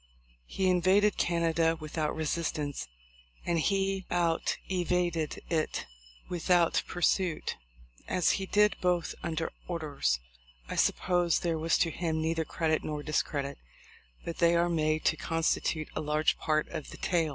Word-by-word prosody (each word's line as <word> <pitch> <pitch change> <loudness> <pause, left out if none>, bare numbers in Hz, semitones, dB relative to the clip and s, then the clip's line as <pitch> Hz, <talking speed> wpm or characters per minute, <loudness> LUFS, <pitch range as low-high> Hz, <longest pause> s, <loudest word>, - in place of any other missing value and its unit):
He 190 - 0
invaded 185 +3 +4
Canada 165 -1 +2
without 155 0 -2
resistance, 155 - -2 0.6
and 170 -1 +1
he 195 +1 0
outvaded 175 -1 0
it 160 -2 -1 0.4
without 175 -1 +2
pursuit. 175 -1 0 0.5
As 180 - +2
he 190 -1 -2
did 210 +1 +4
both 180 -2 +1
under 165 -1 -2 0.2
orders, 145 - -1 0.5
I - - -4
suppose 175 -2 +2
there 165 -2 0
was 165 +1 +2
to 165 - +2
him 160 -1 -1
neither 160 0 0
credit 160 -1 0
nor 150 -1 -4
discredit; 140 -2 -1 0.7
but 170 - -5
they 170 0 +5
are 170 +1 +3
made 155 -2 +1
to 160 - +3
constitute 165 0 0
a - - -1
large 150 +1 +2
part 155 -1 +1
of 155 -3 -6
the - - -10
tail. 165 -3 +1
165 Hz, 135 wpm, -30 LUFS, 155-175 Hz, 0.7 s, they